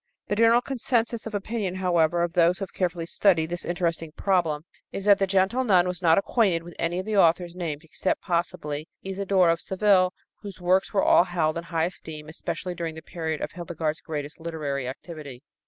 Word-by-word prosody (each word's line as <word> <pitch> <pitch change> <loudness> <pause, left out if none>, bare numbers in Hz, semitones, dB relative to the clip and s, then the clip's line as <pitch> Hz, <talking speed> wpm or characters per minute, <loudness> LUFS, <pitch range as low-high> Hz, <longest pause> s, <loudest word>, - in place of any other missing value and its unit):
The 205 - +1
general 230 +2 +5
consensus 240 -3 -1
of 220 - -5
opinion, 205 -2 -2
however, 175 -2 +2
of 170 -1 -2
those 175 +1 +4
who - - -4
have 190 - -8
carefully 175 -2 -1
studied 170 -2 +2
this 175 - -4
interesting 170 -2 -2
problem 165 -7 0 0.3
is 195 - -3
that 205 -1 +6
the 195 - +2
gentle 195 +7 +2
nun 185 -6 +4
was 180 0 -4
not 165 -2 +5
acquainted 195 -5 +2
with 175 0 -10
any 170 +1 0
of 185 - -3
the 215 -1 -1
authors 170 -1 +3
named, 165 -4 -4
except, 165 +3 -2
possibly, 155 -3 -2 0.2
Isodore 190 -2 +2
of 165 - -1
Seville, 190 -2 +3 0.3
whose 200 -3 -9
works 185 +2 +2
were 200 - +2
all 175 - +6
held 165 -4 0
in 170 - -9
high 165 -1 0
esteem, 155 -3 -7
especially 180 +3 -4
during 165 -2 -4
the 160 - -9
period 160 -2 -4
of - - -3
Hildegard's 165 -3 -3
greatest 150 -1 -6
literary 150 -5 -3
activity. 140 -1 -8
175 Hz, 195 wpm, -26 LUFS, 160-190 Hz, 0.3 s, that